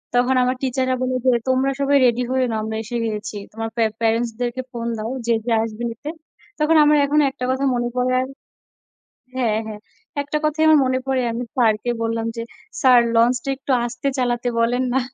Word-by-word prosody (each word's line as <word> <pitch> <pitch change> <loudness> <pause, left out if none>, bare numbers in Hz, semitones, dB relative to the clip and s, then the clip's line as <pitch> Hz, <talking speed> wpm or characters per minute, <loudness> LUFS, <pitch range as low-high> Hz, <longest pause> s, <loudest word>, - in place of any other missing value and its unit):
তখন 250 +2 +3
আমার 255 +1 +1
teacher 260 0 0
রা - - +2
বলে 255 0 0
যে, - - +5 0.2
"তোমরা 260 +1 +2
সবাই 280 0 +2
ready 245 +1 +2
হয়ে 260 -1 +2
নাও। 220 -1 -1
আমরা 220 0 -4
এসে 240 +2 -6
গেছি। 215 0 -5 0.2
তোমার 225 +1 -4
পে 230 - +2 0.2
parents 230 +1 +1
দেরকে 245 +1 -2
phone 235 -1 -4
দাও 220 +1 -4 0.2
যে, - - +2
যে 240 - -1
আসবে 225 +1 -6
নিতে।" 290 +7 -7 0.5
তখন 305 +2 +3
আমার 300 0 +5
এখনও 295 +1 +3
একটা 250 - -5
কথা 265 +1 -1
মনে 240 0 -1
পড়ে 250 0 +1
আর 260 - -3 1.1
হ্যাঁ, 230 -4 +1
হ্যাঁ, 210 -1 -7 0.4
একটা 285 +1 -3
কথাই 305 +1 +1
আমার 310 -1 +7
মনে 255 0 +1
পড়ে। 265 -1 +1
আমি 235 +2 -3
স্যারকে 225 -1 +2
বললাম 225 0 -1
যে, 230 - -3 0.4
"স্যার, 255 -2 +6
লঞ্চটা 245 +3 +2
একটু 270 - -9
আস্তে 245 +3 -3
চালাতে 245 -1 0
বলেন 245 +2 +1
না।" 265 - +2
245 Hz, 200 wpm, -21 LUFS, 230-260 Hz, 1.1 s, আমার